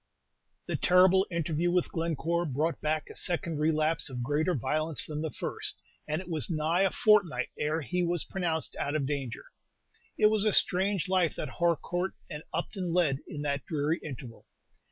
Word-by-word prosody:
The -, -, -2 dB
terrible 185 Hz, +1 st, +5 dB
interview 170 Hz, 0 st, 0 dB
with 180 Hz, 0 st, +1 dB
Glencore 170 Hz, +1 st, -1 dB
brought 155 Hz, +4 st, -1 dB
back 155 Hz, 0 st, -1 dB
a -, -, -12 dB
second 170 Hz, -3 st, -1 dB
relapse 155 Hz, 0 st, +2 dB
of 125 Hz, -2 st, -4 dB
greater 150 Hz, +7 st, +1 dB
violence 150 Hz, +5 st, 0 dB
than 150 Hz, -1 st, -4 dB
the 160 Hz, -, -2 dB
first, -, -, -2 dB, 0.3 s
and 155 Hz, +2 st, -1 dB
it 185 Hz, -, -9 dB
was 160 Hz, -5 st, 0 dB
nigh 165 Hz, +2 st, +1 dB
a 195 Hz, -, +4 dB
fortnight 195 Hz, -, +3 dB
ere 155 Hz, +2 st, 0 dB
he 180 Hz, +6 st, -2 dB
was 175 Hz, -1 st, +1 dB
pronounced 170 Hz, -4 st, -2 dB
out 145 Hz, -, -2 dB
of 145 Hz, -3 st, 0 dB
danger. 135 Hz, -5 st, -4 dB, 0.7 s
It 210 Hz, -, +5 dB
was 215 Hz, -2 st, +2 dB
a 215 Hz, -2 st, +2 dB
strange 190 Hz, 0 st, +3 dB
life 185 Hz, -3 st, +2 dB
that -, -, -4 dB
Harcourt 175 Hz, +2 st, 0 dB, 0.2 s
and 150 Hz, -1 st, -5 dB
Upton 180 Hz, +1 st, -3 dB
led 165 Hz, -6 st, +2 dB
in 150 Hz, -1 st, -6 dB
that 140 Hz, -2 st, -1 dB
dreary 155 Hz, +1 st, 0 dB
interval. 130 Hz, -5 st, -9 dB
160 Hz, 175 wpm, -29 LUFS, 150-180 Hz, 0.7 s, terrible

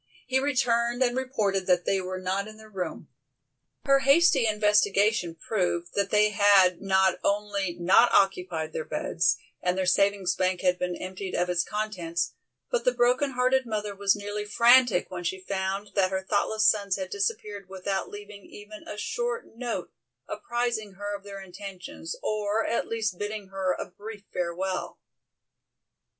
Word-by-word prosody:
He 260 Hz, +1 st, +1 dB
returned 245 Hz, -3 st, +1 dB
and 245 Hz, -1 st, +1 dB
reported 215 Hz, -8 st, -1 dB
that 180 Hz, -1 st, +3 dB
they 195 Hz, -1 st, +1 dB
were 185 Hz, 0 st, -5 dB
not 190 Hz, +2 st, -2 dB
in 215 Hz, 0 st, -11 dB
their 220 Hz, 0 st, -15 dB
room. 185 Hz, -3 st, -5 dB, 0.8 s
Her 275 Hz, -1 st, +5 dB
hasty 275 Hz, -2 st, +4 dB
investigation 210 Hz, -3 st, +2 dB
proved 175 Hz, -2 st, -2 dB
that 200 Hz, -1 st, 0 dB
they 210 Hz, 0 st, +3 dB
had 200 Hz, -3 st, +5 dB
not 190 Hz, -2 st, +2 dB
only 200 Hz, -3 st, -1 dB
not 190 Hz, +7 st, +5 dB
occupied 180 Hz, -5 st, +1 dB
their 160 Hz, -, -3 dB
beds, 170 Hz, +2 st, 0 dB, 0.2 s
and 180 Hz, +1 st, 0 dB
their 190 Hz, -, 0 dB
savings 195 Hz, 0 st, +2 dB
bank 185 Hz, -1 st, 0 dB
had 180 Hz, -1 st, +2 dB
been 180 Hz, -1 st, -2 dB
emptied 185 Hz, +1 st, -6 dB
of 180 Hz, 0 st, 0 dB
its 175 Hz, 0 st, +2 dB
contents, 185 Hz, -6 st, -3 dB, 0.4 s
but 485 Hz, -1 st, 0 dB
the -, -, +2 dB
broken 250 Hz, +3 st, +2 dB
hearted 255 Hz, +1 st, +2 dB
mother 210 Hz, -2 st, -3 dB
was 200 Hz, +1 st, +2 dB
nearly 205 Hz, 0 st, -4 dB
frantic 235 Hz, -1 st, +4 dB
when 180 Hz, -1 st, -5 dB
she 190 Hz, +2 st, -2 dB
found 195 Hz, +1 st, -3 dB
that 190 Hz, -2 st, +2 dB
her 190 Hz, 0 st, -3 dB
thoughtless 215 Hz, +1 st, +1 dB
sons 200 Hz, -3 st, +3 dB
had 190 Hz, -1 st, -5 dB
disappeared 205 Hz, -1 st, -3 dB
without 190 Hz, 0 st, -3 dB
leaving 205 Hz, -1 st, -10 dB
even 210 Hz, +1 st, -12 dB
a 210 Hz, -, -6 dB
short 240 Hz, +2 st, -3 dB
note 240 Hz, 0 st, -4 dB, 0.4 s
apprising 235 Hz, -4 st, -2 dB
her 205 Hz, +1 st, -4 dB
of 200 Hz, -, -8 dB
their 200 Hz, -1 st, -8 dB
intentions, 190 Hz, -3 st, -8 dB
or 215 Hz, +1 st, 0 dB
at 235 Hz, -, -1 dB
least 215 Hz, -5 st, -2 dB
bidding 205 Hz, -1 st, -5 dB
her 190 Hz, -1 st, -1 dB
a -, -, -3 dB
brief 205 Hz, +3 st, -10 dB
farewell. 180 Hz, +2 st, -3 dB
200 Hz, 160 wpm, -27 LUFS, 185-220 Hz, 0.8 s, Her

